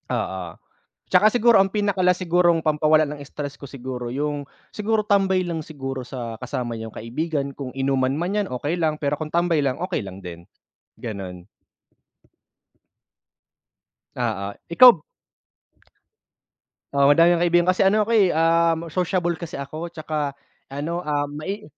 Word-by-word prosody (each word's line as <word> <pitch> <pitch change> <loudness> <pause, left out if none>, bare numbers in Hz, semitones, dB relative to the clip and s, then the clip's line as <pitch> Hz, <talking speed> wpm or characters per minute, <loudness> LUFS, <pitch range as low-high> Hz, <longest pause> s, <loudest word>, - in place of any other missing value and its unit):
Oo. 90 -3 -3 0.5
Tsaka 215 - +5
siguro 235 -2 +5
ang 195 - +1
pinaka-last 190 -3 +1
sigurong 170 -1 +3
pampawala 155 0 +3
ng 145 0 -7
stress 145 0 -6
ko - - -10
siguro 125 -2 -6
yung 145 +2 -3 0.3
siguro 215 0 0
tambay 190 -3 +2
lang 170 -2 -3
siguro 135 -4 -6
sa 120 -3 -6
kasama 125 -1 -3
yung 110 0 -7
kaibigan. 140 +4 -3
Kung 135 -1 -6
inuman 135 -1 +1
man 175 +5 -2
'yan, 205 -2 0
okey 145 +7 -2
lang. 155 -1 +1
Pero 145 0 0
kung 155 +1 -5
tambay 170 -2 +2
lang, 135 -2 0
okey 180 - -2
lang 95 0 -9
din, 85 -1 -9 0.6
gano'n. 95 -5 -6 2.7
Oo, 100 +1 -2
ikaw 195 0 +7 1.9
Oo, 140 0 +4
madami 165 +4 +6
akong 170 -1 +2
kaibigan 175 +1 +3
kasi 185 - -1
ano 210 +2 +3
ako, 220 - -4
eh, 215 -4 +5 0.6
sociable 180 -1 0
kasi 170 - -7
ako. 145 +5 -5
Tsaka 155 -4 -4 0.3
ano, 150 +5 -4
ah, 150 -4 -1
mai 155 +9 -5
155 Hz, 140 wpm, -23 LUFS, 135-180 Hz, 2.7 s, ikaw